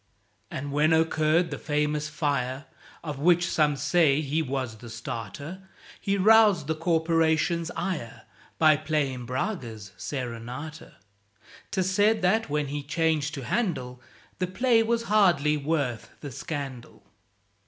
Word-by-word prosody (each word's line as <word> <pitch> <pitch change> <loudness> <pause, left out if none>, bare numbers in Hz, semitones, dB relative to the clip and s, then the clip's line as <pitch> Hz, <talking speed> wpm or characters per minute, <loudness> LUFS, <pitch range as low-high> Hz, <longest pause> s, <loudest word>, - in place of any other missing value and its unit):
And 140 +2 -5
when 150 +3 +3
occurred 160 +1 +2
the 145 - -4
famous 150 0 -1
fire, 140 -3 -2 0.4
Of 150 -4 -5
which 175 +3 +4
some 150 -2 +2
say 150 +1 +3
he 155 +2 0
was 130 -6 -3
the 115 +1 -11
starter, 115 - -6 0.4
He 200 0 0
roused 210 -5 +5
the 160 - 0
Corporation's 165 0 +1
ire 155 - -4 0.3
By 155 -2 +5
playing 140 -5 -2
Braga's 125 - -4
"Serenata"; 125 +4 -6 0.8
('Tis 185 -1 0
said 210 +2 +3
that, 215 +1 +2
when 145 -1 -1
he 145 +1 -3
changed 150 +1 0
to 135 - -6
Handel, 145 - -2 0.4
The 185 - 0
"play 230 +5 +3
was 230 +1 0
hardly 175 -9 +3
worth 140 -5 -2
the 145 - -6
scandal." 135 -2 -6
150 Hz, 130 wpm, -27 LUFS, 140-175 Hz, 0.8 s, roused